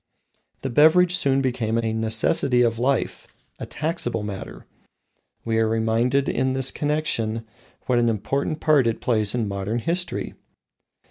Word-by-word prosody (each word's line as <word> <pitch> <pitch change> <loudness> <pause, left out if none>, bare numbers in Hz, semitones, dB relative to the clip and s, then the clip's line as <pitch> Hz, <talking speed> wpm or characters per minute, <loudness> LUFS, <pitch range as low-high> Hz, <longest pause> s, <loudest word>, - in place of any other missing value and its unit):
The 135 - -3
beverage 170 +7 +5
soon 135 -6 +2
became 115 -3 -1
a 115 -1 -1
necessity 115 +3 +1
of 115 -1 0
life 135 +3 -1 0.3
a - - -6
taxable 155 - -2
matter. 100 -2 -7 0.8
We 115 -1 0
are 110 -1 +2
reminded 115 +5 +1
in 130 0 0
this 135 0 0
connection 115 -7 -1 0.4
what 125 -1 +2
an 120 -1 +2
important 140 +8 -2
part 150 -6 +3
it 115 - -1
plays 110 -3 0
in 115 -3 -1
modern 100 +3 -3
history. 170 +8 -2
120 Hz, 140 wpm, -23 LUFS, 110-140 Hz, 0.8 s, beverage